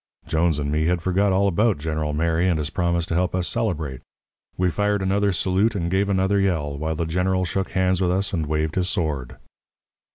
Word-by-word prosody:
Jones 80 Hz, -1 st, +1 dB
and 70 Hz, -1 st, -2 dB
me 80 Hz, +1 st, +1 dB
had 90 Hz, 0 st, +1 dB
forgot 95 Hz, +2 st, +2 dB
all 100 Hz, +2 st, +3 dB
about 105 Hz, +1 st, +2 dB
General 75 Hz, 0 st, -2 dB
Mary 85 Hz, +3 st, +1 dB
and 85 Hz, -, +1 dB
his 75 Hz, -1 st, -3 dB
promise 85 Hz, -2 st, 0 dB
to -, -, -4 dB
help 90 Hz, +1 st, 0 dB
us 90 Hz, -1 st, 0 dB
celebrate. 80 Hz, -, -2 dB, 0.6 s
We 90 Hz, -1 st, +1 dB
fired 105 Hz, +1 st, 0 dB
another 100 Hz, +1 st, +1 dB
salute 95 Hz, +4 st, +1 dB
and 85 Hz, -3 st, -2 dB
gave 100 Hz, +1 st, +1 dB
another 95 Hz, +1 st, +2 dB
yell, 80 Hz, -7 st, 0 dB
while 80 Hz, +3 st, -2 dB
the 85 Hz, -, -2 dB
General 90 Hz, +3 st, 0 dB
shook 95 Hz, +1 st, -2 dB
hands 95 Hz, -1 st, +1 dB
with 90 Hz, -, +2 dB
us 95 Hz, +3 st, 0 dB
and 80 Hz, -4 st, -1 dB
waved 80 Hz, +1 st, -1 dB
his 90 Hz, -1 st, 0 dB
sword. 75 Hz, -9 st, -2 dB
90 Hz, 205 wpm, -23 LUFS, 80-95 Hz, 0.6 s, all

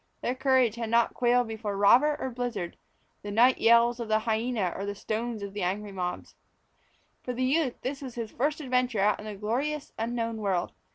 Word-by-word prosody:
Their 245 Hz, -, 0 dB
courage 260 Hz, -4 st, +2 dB
had 230 Hz, -2 st, -3 dB
not 235 Hz, +1 st, +3 dB
quailed 245 Hz, 0 st, +2 dB
before 220 Hz, -2 st, -4 dB
robber 255 Hz, +9 st, +5 dB
or 260 Hz, -, -3 dB
blizzard, 240 Hz, -8 st, -4 dB, 0.5 s
the 205 Hz, -, -7 dB
night 240 Hz, +5 st, +4 dB
yells 235 Hz, +1 st, +5 dB
of 235 Hz, -, -4 dB
the 215 Hz, 0 st, +3 dB
hyena 220 Hz, -3 st, -1 dB
or 195 Hz, -, -4 dB
the 200 Hz, 0 st, -4 dB
stones 220 Hz, +1 st, -3 dB
of 200 Hz, 0 st, -7 dB
angry 200 Hz, +2 st, -2 dB
mobs. 180 Hz, -2 st, -4 dB, 0.9 s
For 250 Hz, -, -4 dB
the 255 Hz, +1 st, -2 dB
youth 275 Hz, -1 st, +1 dB
this 275 Hz, +2 st, -3 dB
was 260 Hz, -4 st, -7 dB
his 230 Hz, -2 st, -5 dB
first 295 Hz, +5 st, -1 dB
adventure 250 Hz, -4 st, 0 dB
out 205 Hz, +1 st, +2 dB
into 215 Hz, 0 st, -6 dB
the -, -, -10 dB
glorious, 270 Hz, +8 st, -2 dB
unknown 230 Hz, 0 st, -2 dB
world. 195 Hz, -5 st, -1 dB
230 Hz, 190 wpm, -28 LUFS, 210-250 Hz, 0.9 s, robber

